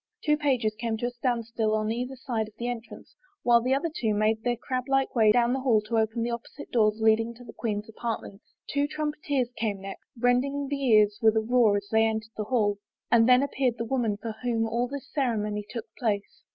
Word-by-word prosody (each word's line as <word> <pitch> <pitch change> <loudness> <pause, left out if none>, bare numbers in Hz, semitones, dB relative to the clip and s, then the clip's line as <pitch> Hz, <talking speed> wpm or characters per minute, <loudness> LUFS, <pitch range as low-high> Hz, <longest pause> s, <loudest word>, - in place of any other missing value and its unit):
Two 300 -1 +3
pages 260 -7 +1
came 220 0 -3
to 240 - -3
a 245 - -1
standstill 230 -3 -1
on 215 0 0
either 250 +3 -3
side 235 -4 -3
of 215 - -16
the 240 - -3
entrance 240 -1 -7 0.3
while 235 -1 +5
the 255 +3 +2
other 310 +4 -1
two 220 -7 0
made 215 +1 +1
their 245 +1 0
crab 255 +1 -3
like 270 -1 +1
way 220 -3 +5
down 240 +2 +3
the 265 - 0
hall 250 -5 +3
to 225 +2 -1
open 220 +1 0
the 240 - -1
opposite 235 0 -7
doors 215 -3 +3
leading 220 +1 +2
to 245 - -13
the 225 - -11
queen's 210 -2 -3
apart 225 +1 -4
ments. 200 +2 -14
Two 285 0 0
trumpeters 295 -4 -2
came 210 -3 -2
next, 195 0 -9
rending 270 +3 +1
the 280 -1 -2
ears 210 -3 +4
with 220 -1 +4
a - - +3
roar 225 -2 +3
as 200 0 -5
they 220 0 +4
entered 220 0 -3
the 215 - -3
hall, 205 -4 +1 0.3
and 235 0 +5
then 250 +2 +6
appeared 265 -4 0
the 230 - -3
woman 230 -4 0
for 225 +2 -5
whom 230 -2 0
all 235 +2 0
this 280 0 -7
ceremony 215 -6 -1
took 230 -3 -5
place. 210 -4 -2
235 Hz, 225 wpm, -27 LUFS, 220-250 Hz, 0.3 s, then